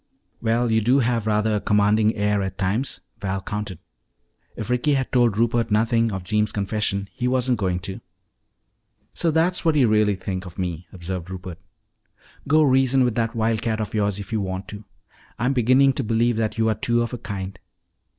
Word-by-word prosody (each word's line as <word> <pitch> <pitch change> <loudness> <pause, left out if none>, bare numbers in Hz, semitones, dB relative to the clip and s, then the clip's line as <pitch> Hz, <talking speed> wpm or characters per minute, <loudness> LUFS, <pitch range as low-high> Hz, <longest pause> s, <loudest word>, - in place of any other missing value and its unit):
"Well, 115 +1 +1
you 110 0 +3
do 125 +5 +3
have 120 -4 +1
rather 105 0 +1
a - - +1
commanding 105 +2 +2
air 105 -1 +1
at 95 -1 -4
times," 105 +7 -1 0.2
Val 95 0 -2
countered. 105 -2 -5 0.8
If 115 +2 -5
Ricky 130 +4 +2
had 130 -1 -2
told 120 -5 +3
Rupert 115 0 +1
nothing 115 +1 +2
of 95 -2 -4
Jeems' 105 +2 0
confession, 100 -1 -1
he 125 -1 -2
wasn't 125 -2 +1
going 90 -3 -1
to. 95 +1 -6 1.1
"So 170 - 0
that's 165 +3 +1
what 160 -3 +2
you 135 -5 +4
really 105 -1 +3
think 95 0 -5
of 85 - -12
me!" 90 -2 -4
observed 90 -1 -6
Rupert. 90 -2 -7 0.9
"Go 155 +2 +5
reason 130 -1 +3
with 120 -2 +1
that 115 -1 -1
wildcat 110 0 0
of 110 - -4
yours 105 -2 0
if 100 +2 -7
you 110 - +1
want 95 0 -4
to. 105 0 -9 0.5
I'm 125 +4 +1
beginning 130 +2 +4
to 135 - -2
believe 115 +1 +1
that 110 -1 -1
you 110 0 +2
are 110 - +3
two 120 +3 +1
of 120 - -5
a 125 - -4
kind." 95 -2 -6
110 Hz, 190 wpm, -23 LUFS, 100-120 Hz, 1.1 s, Go